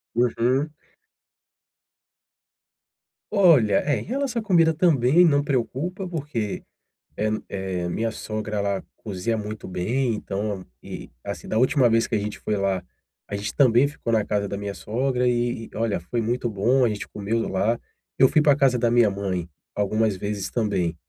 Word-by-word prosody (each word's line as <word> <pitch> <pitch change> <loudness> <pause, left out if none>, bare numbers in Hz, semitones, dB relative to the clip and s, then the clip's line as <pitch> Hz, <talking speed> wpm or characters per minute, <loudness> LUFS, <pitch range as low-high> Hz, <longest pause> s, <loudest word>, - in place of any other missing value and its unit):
Uhum. 125 +4 +2 2.6
Olha, 160 - +5
é, 145 -1 +1
em - - -6
relação 255 +1 -1
à - - -12
comida 165 -5 +4
também 160 -1 +4
não 145 -3 +3
preocupa 145 - -2
porque, 145 - -3 0.5
eh 110 +1 +1 0.2
eh, 95 -3 -3
minha 115 +5 -1
sogra, 110 -1 -4
ela 100 -1 -1
cozinha 105 +2 -3
muito 105 0 -6
bem, 115 +8 0
então, 100 -2 -3 0.2
e, - - -8
assim, - - -6
da 110 - -1
última 130 +1 +4
vez 115 0 +3
que - - -8
a 110 - +3
gente 105 +1 -4
foi 105 - -2
lá, 95 -2 0 0.4
a - - -4
gente 100 +1 -4
também 130 -1 +5
ficou 140 -5 -4
na 110 -2 +3
casa 100 -1 -1
da 100 - -4
minha 100 0 -5
sogra, 125 +3 0
e 120 -1 0
e - - -13
olha, 110 -3 0
foi 100 +8 -3
muito 120 +2 -1
bom, 120 +5 +2
a - - +2
gente 105 -1 -4
comeu 110 +3 -2
lá. 105 +5 +1 0.4
Eu 130 - +7
fui 155 - +3
pra 145 -2 +5
casa 135 -3 +3
da 120 -1 +1
minha 120 -3 +5
mãe 95 -3 -3 0.2
algumas 105 +1 +1
vezes 100 0 -4
também 100 -7 0
115 Hz, 170 wpm, -24 LUFS, 100-135 Hz, 2.6 s, Eu